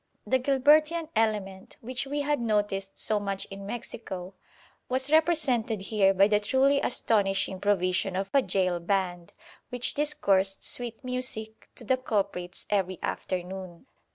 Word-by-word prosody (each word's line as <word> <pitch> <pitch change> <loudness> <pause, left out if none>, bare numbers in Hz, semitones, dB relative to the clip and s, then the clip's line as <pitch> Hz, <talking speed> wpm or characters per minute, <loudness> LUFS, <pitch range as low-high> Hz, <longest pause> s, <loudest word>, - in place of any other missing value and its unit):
The 260 - +2
Gilbertian 300 +5 +3
element, 205 -4 -1
which 255 +3 -5
we 290 +1 -1
had 290 0 0
noticed 205 -4 -1
so 215 -1 0
much 195 -1 -2
in 195 0 -8
Mexico, 195 -5 -6 0.6
was 260 +2 -1
represented 290 - +2
here 195 0 +2
by 195 +1 +5
the 210 -1 +3
truly 265 +6 +3
astonishing 195 -5 +1
provision 190 -1 +1
of 195 +1 -1
a 275 - +5
gaol 185 -4 0
band, 175 -1 -2 0.4
which 245 -1 0
discoursed 200 -11 +1
sweet 240 0 -4
music 250 -4 -4
to - - -8
the 255 +3 +2
culprits 195 -7 -2
every 190 -3 0
afternoon. 185 +1 -4
210 Hz, 135 wpm, -28 LUFS, 195-255 Hz, 0.6 s, by